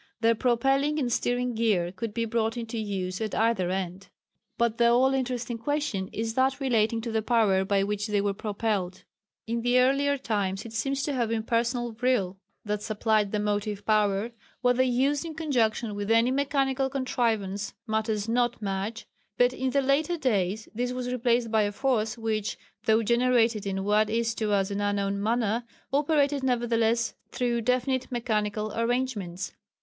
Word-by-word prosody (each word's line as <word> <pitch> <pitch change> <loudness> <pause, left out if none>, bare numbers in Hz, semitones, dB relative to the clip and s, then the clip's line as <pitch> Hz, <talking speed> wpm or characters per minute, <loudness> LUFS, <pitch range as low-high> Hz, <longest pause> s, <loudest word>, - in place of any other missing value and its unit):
Their 230 0 +5
propelling 270 +5 +1
and 250 -5 0
steering 245 +1 0
gear 210 -7 +1
could 220 +4 -5
be 230 +2 -1
brought 225 +1 -1
into 230 -1 -4
use 190 -2 -3
at 215 -2 -2
either 220 -5 +2
end. 185 0 -4 0.5
But 235 -1 +1
the 235 - +5
all 255 +3 +4
interesting 245 -3 -2
question 230 -8 -2
is 225 +1 -3
that 265 +2 +1
relating 230 -4 +1
to 230 0 -4
the 220 0 +1
power 215 -4 +3
by 195 0 +1
which 205 +1 -2
they 210 -1 +1
were 200 0 0
propelled. 200 -3 -2 0.4
In 230 +1 -2
the 245 +1 +2
earlier 275 +3 +3
times 200 -6 -2
it 230 - -9
seems 275 +4 -1
to 290 - -1
have 240 -4 0
been 225 -1 -1
personal 235 +1 0
vril 220 -5 0 0.3
that 210 0 -2
supplied 215 -1 +1
the 210 - 0
motive 205 0 -2
power 210 0 +2 0.3
whether 250 0 +3
used 260 +4 +2
in 325 -2 -6
conjunction 240 -8 0
with 205 0 -4
any 230 +2 +4
mechanical 270 -1 +1
contrivance 220 -7 -1
matters 220 -1 -1
not 240 +1 +1
much 210 +2 -3 0.3
but 245 0 +4
in 260 0 -1
the 275 +1 +1
later 295 +6 +1
days 210 - 0
this 245 +2 -2
was 250 0 -3
replaced 240 -1 +1
by 220 -1 +4
a 205 0 +1
force 225 -1 0
which, 220 -2 -2 0.3
though 220 +1 +4
generated 235 -2 +2
in 195 0 -2
what 210 +1 +2
is 230 +1 0
to 215 -2 -2
us 195 -1 +1
an 200 +1 -2
unknown 200 -1 0
manner, 230 +1 0 0.3
operated 285 -1 +2
nevertheless 235 -2 +1 0.2
through 240 -1 -1
definite 255 +2 0
mechanical 215 -3 -1
arrangements. 230 -6 -2
230 Hz, 170 wpm, -27 LUFS, 210-250 Hz, 0.5 s, Their